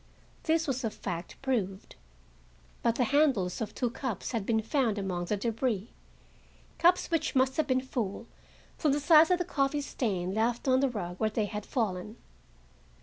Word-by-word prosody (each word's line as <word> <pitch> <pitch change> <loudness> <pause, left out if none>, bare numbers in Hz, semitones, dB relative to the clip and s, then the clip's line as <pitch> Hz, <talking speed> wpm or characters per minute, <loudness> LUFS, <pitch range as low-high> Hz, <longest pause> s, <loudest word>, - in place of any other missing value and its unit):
This 325 0 +2
was 265 -2 -2
a 225 - +1
fact, 175 -4 -6
proved. 200 -8 -2 0.9
But 235 -1 +2
the 250 - +2
handles 260 - +2
of 215 -1 -4
two 245 -3 -1
cups 250 -5 -4
had 225 -5 -2
been 220 -1 +2
found 230 -3 +1
among 185 -3 -2
the 210 +4 -1
debris,—cups 235 - -2
which 330 -4 0
must 260 0 +3
have 310 -2 +1
been 255 -1 +2
full, 235 -5 -3 0.5
from 300 -4 +2
the 290 - +1
size 310 +3 +6
of 360 - +4
the 355 - -2
coffee 290 -3 0
stain 190 -10 -2
left 235 +4 0
on 260 0 +4
the 275 0 +2
rug 180 -6 -5
where 220 - +2
they 215 0 0
had 210 0 -6
fallen. 215 -3 -2
235 Hz, 170 wpm, -30 LUFS, 205-275 Hz, 0.9 s, size